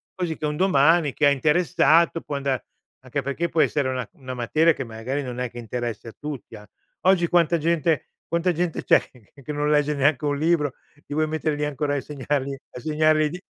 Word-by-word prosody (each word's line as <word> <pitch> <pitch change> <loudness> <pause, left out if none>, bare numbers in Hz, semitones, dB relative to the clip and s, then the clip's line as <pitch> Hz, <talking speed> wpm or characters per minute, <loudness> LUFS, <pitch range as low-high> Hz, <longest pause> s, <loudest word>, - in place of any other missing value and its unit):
quasi 175 -3 -3
che - - -4
un 150 0 -1
domani 165 -3 +4
chi 155 - +1
è - - +7
interessato 165 +3 +3
può 145 - -5
andar 135 -2 -1 0.4
anche 135 +2 -3
perché 140 +6 -1
può 165 - +2
essere 145 -4 +1
una 130 -1 -3
una 130 -2 -8
materia 155 +7 +3
che 135 - -5
magari 120 +5 -4
non 125 -1 -6
è 125 -1 -2
che 120 - -12
interessa 120 -1 -5
a - - -14
tutti, 145 -6 -7
an 105 -1 -12 0.4
oggi 185 -2 +4
quanta 170 -1 +3
gente 160 -2 +1 0.2
quanta 170 +2 +1
gente 170 0 -2
c'è - - +5
che 120 -6 -22
che 150 - -5
non 145 0 0
legge 150 0 +3
neanche 140 +1 +2
un 145 -1 0
libro, 155 -3 +1 0.2
li 145 0 -9
vuoi 155 0 +1
mettere 155 -1 -1
lì 150 - -3
ancora 145 0 -2
a - - +1
insegnargli 140 0 -2
a 135 - -12
insegnargli 155 +2 +2
i 150 - +1
di 180 +4 -8
150 Hz, 215 wpm, -24 LUFS, 135-160 Hz, 0.4 s, è